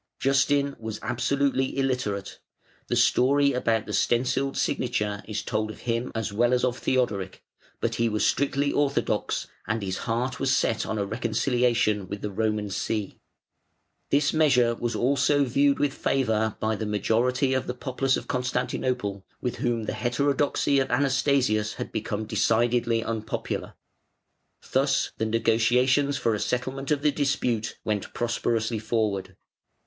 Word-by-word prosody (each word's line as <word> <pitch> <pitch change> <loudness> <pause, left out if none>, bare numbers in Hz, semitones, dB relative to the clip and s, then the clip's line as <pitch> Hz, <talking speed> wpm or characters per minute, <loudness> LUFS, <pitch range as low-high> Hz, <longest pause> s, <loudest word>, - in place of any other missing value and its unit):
Justin 140 +1 +2
was 110 -1 -5
absolutely 130 +3 0
illiterate 125 -8 -2 0.5
the - - 0
story 140 +2 +4
about 115 -3 0
the 105 - -6
stencilled 125 +6 +1
signature 105 -4 -1
is 105 -1 -3
told 110 -1 -1
of 110 - -9
him 120 +1 -2
as 115 -3 -2
well 120 +4 +3
as 125 - -1
of 125 0 -2
Theodoric, 105 -8 -1 0.4
but - - -1
he 115 - +3
was 105 -1 0
strictly 140 0 +1
orthodox, 140 -1 0 0.2
and 110 -1 -1
his 95 -1 -3
heart 120 +3 -1
was 135 - +1
set 110 - 0
on 110 - -2
a 100 - 0
reconciliation 115 -2 +1
with 100 +2 -6
the 105 - -3
Roman 105 0 -1
See. 105 +1 -3 0.9
This 140 +1 +2
measure 125 -7 +4
was 120 0 -3
also 140 +4 +2
viewed 140 +2 +2
with 145 -1 +1
favour 110 -5 0
by 110 0 0
the 110 0 -4
majority 120 +6 +1
of 130 - -1
the 125 - -3
populace 130 +1 0
of - - -7
Constantinople, 125 -5 -2 0.2
with 125 - -3
whom 120 -2 -1
the - - -3
heterodoxy 140 +2 +1
of 135 - 0
Anastasius 130 -5 +1
had - - -5
become 110 -1 -3
decidedly 115 +1 +1
unpopular. 110 -2 -4 1.0
Thus - - +2
the 110 - -1
negotiations 120 +5 +2
for 115 -4 +1
a 105 - -1
settlement 130 +4 -2
of 150 -2 +1
the 150 - +4
dispute 135 -6 -1
went 105 -2 -3
prosperously 115 -1 -1
forward. 110 -3 -1
120 Hz, 145 wpm, -26 LUFS, 110-135 Hz, 1.0 s, story